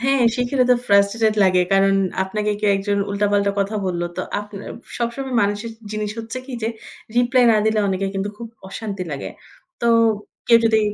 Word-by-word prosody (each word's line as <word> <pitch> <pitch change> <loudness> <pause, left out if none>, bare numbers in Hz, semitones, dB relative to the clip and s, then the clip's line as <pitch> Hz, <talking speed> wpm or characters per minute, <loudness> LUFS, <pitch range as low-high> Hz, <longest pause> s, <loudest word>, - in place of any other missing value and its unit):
হ্যাঁ, 270 0 +2
শিখলে 250 +1 +1
তো - - +7
frustrated 205 +2 +3
লাগে। 185 -1 +4
কারণ 195 0 +4 0.3
আপনাকে 210 +2 -2
কেউ 210 -1 +3
একজন 200 +1 -1
উল্টা-পাল্টা 200 0 +1
কথা 205 +2 -1
বলল। 175 -2 -2
তো 185 - -2 0.2
আপনা 205 -1 -9 0.3
সবসময় 245 +2 -3
মানুষের 205 +3 -2 0.2
জিনিস 210 -1 -3
হচ্ছে 225 +3 -5
কি? 270 - -8
যে, 225 - 0 0.5
রিপ্লাই 245 +1 +4
না 215 - +4
দিলে 220 0 +2
অনেকে 195 +1 -1
কিন্তু 195 +1 -2
খুব 235 - -6 0.2
অশান্তি 200 -2 -5
লাগে 140 - -5 0.5
তো 235 - +3 0.6
কেউ 230 - +7
যদি 220 -1 +4
210 Hz, 170 wpm, -21 LUFS, 200-235 Hz, 0.6 s, তো